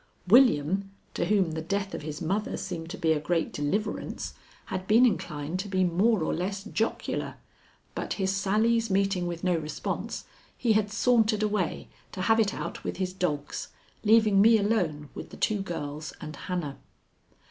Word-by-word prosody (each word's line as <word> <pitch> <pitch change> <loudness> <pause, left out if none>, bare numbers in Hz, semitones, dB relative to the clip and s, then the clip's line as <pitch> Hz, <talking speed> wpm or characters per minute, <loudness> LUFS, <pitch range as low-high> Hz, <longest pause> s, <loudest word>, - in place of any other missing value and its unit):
William, 195 - +5 0.2
to - - 0
whom 195 -5 +2
the 160 0 -3
death 195 +3 -2
of - - -4
his 150 +2 -5
mother 200 +6 -1
seemed 170 -3 -5
to 195 - -6
be 165 -3 +2
a 155 - +2
great 165 +2 -1
deliverance, 205 +9 -2 0.3
had 185 0 -4
been 230 +4 +6
inclined 160 -7 -1
to 195 - -3
be 190 -1 +1
more 185 +3 +3
or - - 0
less 195 +3 -2
jocular, 225 +3 -2 0.6
but - - -3
his 190 -1 0
sallies 225 +4 +2
meeting 195 -2 +1
with 170 0 -5
no 180 -1 +2
response, 155 -2 -4 0.3
he 230 -3 +2
had 210 -1 +1
sauntered 220 -1 +3
away 205 -5 -1 0.2
to 185 - -4
have 225 +2 +4
it 210 -3 +3
out - - -5
with - - -4
his 185 -1 -2
dogs, 150 -6 -2 0.4
leaving 215 -2 +5
me 225 +2 +7
alone 175 -9 0
with - - -8
the - - -11
two 210 -2 +1
girls 155 -4 -5
and 155 - -7
Hannah. 165 -5 -4
190 Hz, 170 wpm, -28 LUFS, 165-210 Hz, 0.6 s, me